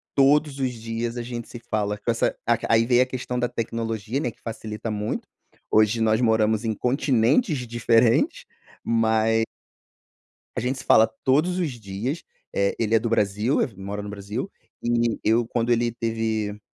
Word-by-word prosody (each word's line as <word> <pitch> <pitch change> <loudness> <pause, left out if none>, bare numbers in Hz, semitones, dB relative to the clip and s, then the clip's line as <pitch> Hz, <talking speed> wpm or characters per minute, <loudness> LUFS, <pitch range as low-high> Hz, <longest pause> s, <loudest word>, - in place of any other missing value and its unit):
Todos 140 +1 +4
os 130 -2 0
dias 115 +1 -4
a - - -2
gente 120 -1 -6
se 120 - -8
fala, 105 -1 0
com 110 - -5
essa 115 -1 +1
a 120 -1 +4
aí 115 0 +4
veio 125 0 +5
a - - -3
questão 125 -1 -4
da 125 0 +1
tecnologia, 115 +1 -3
né, 120 - -1
que 115 - -28
facilita 110 -1 -5
muito. 105 0 -3 0.4
Hoje 110 +1 +3
nós 110 0 +3
moramos 110 -1 +2
em 110 - +1
continentes 125 - +1
diferente, 115 0 +2 0.4
mae 115 0 +2 1.1
a - - +2
gente 130 +3 -2
se - - -10
fala 110 - +6 0.2
todos 155 +7 +2
os 165 -5 0
dias, 115 - -4 0.3
eh, 100 0 +1
ele 115 -1 0
é 110 - +5
do 115 - -2
Brasil, 105 +3 +1
ef 120 - -1
mora 100 +1 -5
no 105 - -7
Brasil, 105 - -5 0.3
e 120 -1 +1
eu, 115 +1 +2
quando 120 0 0
ele 120 0 +2
teve 110 -2 -2
115 Hz, 170 wpm, -24 LUFS, 110-125 Hz, 1.1 s, fala